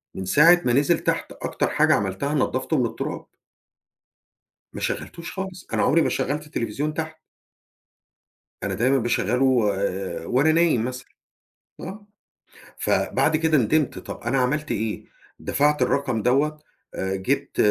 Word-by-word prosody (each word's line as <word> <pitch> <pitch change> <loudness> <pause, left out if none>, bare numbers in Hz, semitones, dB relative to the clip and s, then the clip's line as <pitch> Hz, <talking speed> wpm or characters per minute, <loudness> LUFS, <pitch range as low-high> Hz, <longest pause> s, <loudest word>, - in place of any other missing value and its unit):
من 95 - -5
ساعة 165 - +6
ما 120 - +2
نزل 145 +6 +3
تحت - - -1
أكتر - - -2
حاجة - - +3
عملتها 100 +9 -1
نَضَفتُه 130 +1 0
من 125 - +2
التراب. 115 - -4 1.5
ما - - -7
شَغلّتوش 170 -1 -4
خالص، 190 -2 -6
أنا - - +1
عمري 165 +3 +4
ما - - +2
شغّلت 145 +3 -2
التلفزيون 145 +4 -3
تحت. 160 0 -5 1.5
أنا 100 - -1
دايمًا 125 +8 +2
باشغّله 120 -1 +2
آآ 95 -4 -3
وأنا 135 - +3
نايم 160 -8 +3
مثلًا، 125 0 -6 0.7
آه، 205 +3 -8 0.7
فبَعد 160 - +1
كده 160 -1 +2
ندِمت، 145 +5 +1
طَب - - -8
أنا 125 +3 0
عملت 150 +4 0
إيه، 110 -1 -3 0.3
دفَعت 150 +2 +1
الرقم 130 -6 0
دوّة 145 +6 +2 0.4
آآ، 95 0 -2
جِبت 95 0 -2
135 Hz, 135 wpm, -24 LUFS, 115-155 Hz, 1.5 s, ساعة